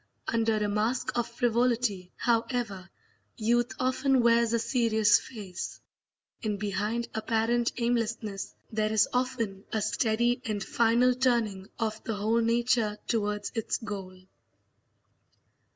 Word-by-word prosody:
Under 225 -1 +1
a 210 -1 0
mask 215 +5 -1
of 240 -1 0
frivolity, 235 -5 0
however, 230 -5 -1 0.5
youth 240 +2 +1
often 260 0 +2
wears 235 -1 +4
a 235 - +3
serious 220 -3 +3
face, 195 -7 -7 0.6
and 210 -2 -1
behind 210 +3 -2
apparent 230 +2 +1
aimlessness 230 -4 -2 0.2
there 215 -1 0
is 220 -1 +4
often 240 -6 -1
a 220 - 0
steady 235 +3 +1
and 210 -3 -2
final 235 +3 +3
turning 230 -7 0
of 220 -1 -2
the 225 - -2
whole 220 +3 +1
nature 230 -2 +1
towards 210 -2 -1
its 225 -2 -1
goal. 195 -4 -7
225 Hz, 120 wpm, -28 LUFS, 210-240 Hz, 0.6 s, wears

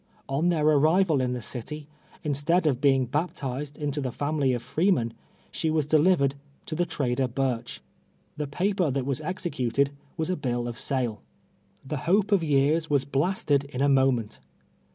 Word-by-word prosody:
On 145 +6 +1
their 160 -4 +1
arrival 155 +1 +4
in 125 -1 0
the 125 -2 -5
city, 145 +6 -6 0.4
instead 150 +4 +1
of 135 -4 +1
Ijeing 135 -3 +3
baptized 145 -3 -3
into 145 0 -2
the 130 -2 -2
family 145 0 0
of 120 -2 -2
freemen, 140 - +1 0.4
slie 160 - 0
was 155 -2 +1
delivered 150 -2 +3 0.3
to - - -5
the 175 +2 0
trader 130 -5 0
Burch. 125 -1 -2 0.5
The 150 -1 -3
paper 180 +3 0
that 135 -1 -1
Avas 140 +1 -1
executed 140 -6 -1 0.3
was 160 +2 -1
a - - +1
bill 120 -5 -2
of 120 -1 -6
sale. 125 -6 -1 0.6
The 145 +3 -3
hope 205 +2 +3
of 195 -4 +4
years 150 +2 +2
Vv'as 140 -3 +1
blasted 145 -2 +1
in 140 -3 -7
a 140 - +4
mo 135 -1 +5
ment. 115 -3 -4
145 Hz, 170 wpm, -26 LUFS, 130-160 Hz, 0.6 s, mo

